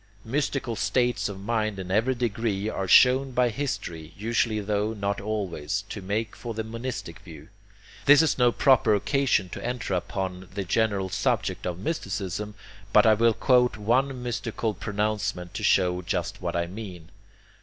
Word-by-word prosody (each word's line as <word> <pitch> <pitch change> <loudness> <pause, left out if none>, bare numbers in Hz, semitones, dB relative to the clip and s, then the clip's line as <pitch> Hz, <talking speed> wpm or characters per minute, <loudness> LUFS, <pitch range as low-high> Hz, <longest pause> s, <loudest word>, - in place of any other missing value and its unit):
Mystical 135 -1 -1
states 125 -1 +1
of 100 -1 -7
mind 110 0 -1
in 95 -1 -6
every 115 +6 +2
degree 110 -3 -1
are 95 -3 -2
shown 130 +5 +6
by 125 0 +3
history, 105 - -4
usually 110 +1 0
tho 105 +1 -1
not 100 -1 -2
always, 100 -3 -3
to 105 - -6
make 105 +4 -2
for 115 -2 -6
the 110 - -2
monistic 115 -6 -6
view. 80 -6 -13 0.6
This 145 +2 +8
is 160 - +2
no 120 -1 +5
proper 130 -5 +4
occasion 130 -3 +1
to - - -7
enter 120 -4 -3
upon 95 0 -3
the 100 - -1
general 100 0 0
subject 105 -3 -1
of 90 -1 -3
mysticism, 105 - -3 0.4
but 105 - +6
I 110 - +7
will 115 +1 +3
quote 125 -3 +3
one 125 +4 +1
mystical 115 -2 -2
pronouncement 105 -3 -2
to - - -5
show 90 -1 +3
just 85 - -3
what - - -3
I 85 0 +1
mean. 90 -3 -9
105 Hz, 160 wpm, -26 LUFS, 95-120 Hz, 0.6 s, This